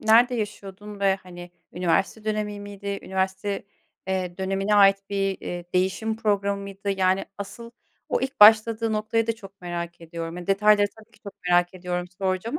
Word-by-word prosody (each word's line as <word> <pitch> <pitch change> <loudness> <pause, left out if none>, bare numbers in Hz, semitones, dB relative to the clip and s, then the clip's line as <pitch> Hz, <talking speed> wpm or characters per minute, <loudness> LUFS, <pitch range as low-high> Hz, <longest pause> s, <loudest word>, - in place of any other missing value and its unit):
nerede 235 +3 +5
yaşıyordun 205 -2 -6
ve, 195 -1 +4
hani, 175 -1 -10 0.2
üniversite 185 +5 0
dönemi 210 -1 -2
miydi? 200 0 -5
Üniversite, 190 +2 -2 0.4
eee, 185 -2 -2
dönemine 195 +2 0
ait 195 -1 +7
bir, 195 -1 -1
eee, 175 -1 -5
değişim 190 +4 0
programı 200 -2 0
mıydı? 200 0 -5
Yani 190 0 +2
asıl 230 +4 -8 0.4
o - - 0
ilk 265 -2 -4
başladığı 220 +1 +7
noktayı 220 +1 0
da 230 - +1
çok 195 -3 -14
merak 170 -1 -5
ediyorum. 165 0 -6
Ya, 180 -1 -7
detayları 205 +1 +4
tabii 220 - -17
ki - - -22
çok 200 - -9 0.2
merak 175 +1 +3
ediyorum 180 -1 -3
soracağım 195 +8 -1
200 Hz, 160 wpm, -25 LUFS, 185-215 Hz, 0.4 s, ait